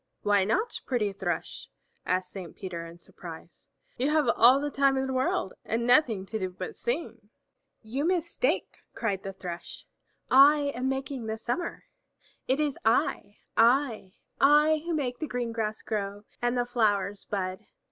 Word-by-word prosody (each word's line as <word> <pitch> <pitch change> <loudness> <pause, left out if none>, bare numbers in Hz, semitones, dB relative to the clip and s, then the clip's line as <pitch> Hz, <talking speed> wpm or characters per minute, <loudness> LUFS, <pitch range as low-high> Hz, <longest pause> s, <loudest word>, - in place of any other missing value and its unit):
"Why 205 -2 +3
not, 435 - 0
pretty 215 -6 0
Thrush?" 195 - -4 0.4
asked 185 0 0
Saint 185 -4 -8
Peter 170 -3 -6
in 165 +1 -12
surprise. 170 -1 -12 0.3
"You 265 +4 +1
have 305 -3 +2
all 255 +4 +7
the 290 0 -2
time 275 -1 +3
in 265 - 0
the 265 - -3
world 255 -7 0
and 230 +1 -1
nothing 245 -6 +3
to 220 +3 -4
do 185 -2 -2
but 185 0 -7
sing." 240 -5 -4 0.5
"You 250 +6 -3
mistake," 350 +6 0 0.2
cried 200 -5 -1
the 195 - -5
Thrush. 180 -2 -8 0.5
"I 285 +2 +6
am 255 +2 -1
making 265 -3 -3
the 220 0 -2
summer! 245 +10 -3 0.6
It 265 +3 +1
is 295 -3 -1
I, 215 -2 +1 0.2
I, 230 -5 +3 0.3
I 300 +2 +5
who 340 - 0
make 250 -5 -2
the 310 - -3
green 245 -3 -2
grass 220 -1 -3
grow 205 -1 -3 0.2
and 240 +1 +1
the 245 - +1
flowers 205 -4 0
bud. 185 -2 -3
235 Hz, 160 wpm, -28 LUFS, 200-275 Hz, 0.6 s, all